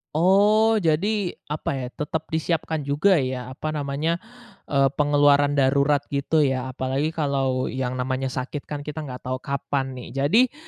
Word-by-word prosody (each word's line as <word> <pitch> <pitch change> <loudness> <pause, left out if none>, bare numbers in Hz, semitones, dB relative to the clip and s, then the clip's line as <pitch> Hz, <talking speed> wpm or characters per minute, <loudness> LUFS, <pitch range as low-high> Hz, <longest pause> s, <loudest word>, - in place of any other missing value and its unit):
Oh, 210 +6 +4
jadi, 190 +3 +1 0.2
apa 150 - -3
ya, 130 -2 -3
tetap 155 +3 -4
disiapkan 160 -2 -1
juga 165 +6 +3
ya, 130 -2 -2
apa 155 +4 -4
namanya, 150 +4 -1 0.5
e 140 -1 +3
pengeluaran 145 -1 +3
darurat, 140 +1 +3
gitu 145 +2 +1
ya, 130 -1 -1
apalagi 135 +4 -1
kalau 135 -5 0
yang 130 -1 -3
namanya 130 +1 -1
sakit 135 +2 -4
kan, 145 -1 -5
kita 150 +1 -5
enggak 130 -4 -8
tahu 130 0 -3
kapan 135 -1 -3
nih. 125 - -9
Jadi, 210 - +3
145 Hz, 150 wpm, -24 LUFS, 135-160 Hz, 0.5 s, Oh